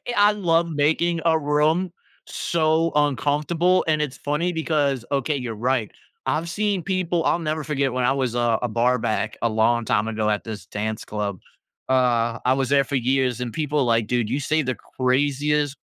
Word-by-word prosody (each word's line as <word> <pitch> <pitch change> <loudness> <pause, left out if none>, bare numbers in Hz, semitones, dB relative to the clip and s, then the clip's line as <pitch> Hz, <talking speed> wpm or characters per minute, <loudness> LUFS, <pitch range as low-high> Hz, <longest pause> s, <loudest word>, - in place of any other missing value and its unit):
I 205 +1 +5
love 170 -4 +1
making 160 +3 +1
a 160 -1 +4
room 155 +4 +1 0.4
so 160 0 +1
uncomfortable, 150 +5 +2
and 155 -1 +2
it's 145 -3 -3
funny 170 +5 -1
because 145 -6 0
okay, 140 +2 0
you're 120 -4 -4
right, 120 -1 -1 0.3
I've 165 +2 -1
seen 200 -2 -1
people 180 -3 -1
I'll - - +2
never 155 -1 -2
forget 140 -3 -1
when 125 -1 0
I - - +3
was 130 -3 -1
a 120 -2 +1
a 125 - -1
barback 120 0 0
a 115 - +2
long 110 +1 +2
time 105 +2 +1
ago 110 -1 -1
at 105 - -1
this 105 -5 -7
dance 110 +1 -4
club, 105 -3 -4 0.5
uh, 120 -3 +2
I 130 - +4
was 135 0 -1
there 140 -1 +4
for 140 - -4
years, 130 -1 +1
and 120 -2 -4
people 150 -3 0
like, 115 -2 +1
"Dude, 120 -3 0
you 135 - -1
say 155 +3 +1
the 130 -3 -2
craziest, 145 +3 0
140 Hz, 180 wpm, -23 LUFS, 120-155 Hz, 0.5 s, I